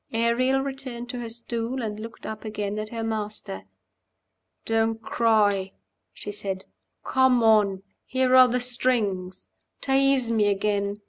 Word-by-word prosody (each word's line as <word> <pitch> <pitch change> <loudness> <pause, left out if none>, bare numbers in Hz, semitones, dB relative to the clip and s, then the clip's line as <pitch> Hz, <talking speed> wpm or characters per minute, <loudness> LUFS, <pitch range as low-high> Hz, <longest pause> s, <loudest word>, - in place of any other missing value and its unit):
Ariel 250 +4 +2
returned 265 -3 -6
to 245 - -5
her 235 -1 -5
stool, 235 +2 -4
and 210 -1 -4
looked 230 +1 -9
up 220 -1 -6
again 210 -1 -3
at 215 0 -5
her 230 0 -4
master. 210 - -4 1.0
"Don't 225 0 +1
cry," 210 -4 +1 0.4
she 205 - -7
said. 195 -2 -5 0.4
"Come 260 -2 +3
on. 205 -4 +3 0.2
Here 260 0 +2
are 255 0 +9
the 250 +1 0
strings. 225 -7 0 0.3
Tease 270 -3 +2
me 215 -2 +2
again. 200 0 0
225 Hz, 135 wpm, -25 LUFS, 205-250 Hz, 1.0 s, are